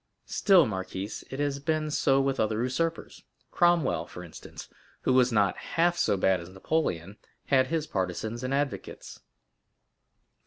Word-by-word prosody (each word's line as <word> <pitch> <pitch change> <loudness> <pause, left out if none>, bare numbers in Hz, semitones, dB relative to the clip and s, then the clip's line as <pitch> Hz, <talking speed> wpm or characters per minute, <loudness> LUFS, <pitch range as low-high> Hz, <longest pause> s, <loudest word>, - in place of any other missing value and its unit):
Still, 190 -5 +4
marquise, 95 -1 -5
it 135 - -6
has 145 -1 -1
been 155 +1 -1
so 135 -2 +3
with 135 0 0
other 110 +1 +1
usurpers—Cromwell, 165 +2 -1
for 90 - -9
instance, 85 - -11 0.3
who 130 - +1
was 125 -1 +4
not 100 -4 +2 0.2
half 175 +1 +4
so 100 - +1
bad 95 0 +2
as 85 - -10
Napoleon, 95 - -2 0.3
had 130 -2 +3
his 160 0 -1
partisans 105 - -3
and 130 - -2
advocates." 140 0 -3
130 Hz, 140 wpm, -28 LUFS, 100-155 Hz, 0.3 s, Still